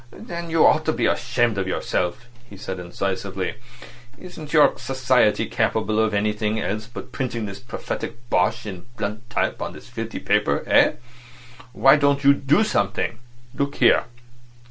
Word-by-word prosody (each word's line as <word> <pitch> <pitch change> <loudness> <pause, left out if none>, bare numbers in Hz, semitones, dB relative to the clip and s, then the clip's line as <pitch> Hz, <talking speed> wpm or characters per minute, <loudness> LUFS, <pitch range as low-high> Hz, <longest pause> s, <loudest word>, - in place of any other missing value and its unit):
"Then 170 - -7
you 165 -1 +4
ought - - +4
to - - +1
be - - 0
ashamed 115 -4 +1
of 95 - -2
yourself," 90 +3 -2 0.2
he 100 - -11
said 95 -1 -6
incisively. 95 +1 -3 0.6
"Isn't 165 -5 -10
your 150 -3 +5
society 130 -4 +2
capable 110 +2 0
of 110 -1 +2
anything 105 +1 0
else 110 +1 -3
but 115 - -9
printing 120 -4 -3
this 100 -1 -7
prophetic 120 +3 -6
bosh 115 +1 +1
in 95 -2 -8
blunt 110 +3 -5
type - - -1
on - - -4
this - - -13
filthy - - -5
paper - - +1
eh? - - +5 0.8
Why 135 +3 +6
don't 140 -1 +2
you 140 +1 +7
do 140 +8 +2
something? 110 - -1 0.3
Look 140 0 -2
here. 120 -2 +4
115 Hz, 155 wpm, -23 LUFS, 100-140 Hz, 0.8 s, you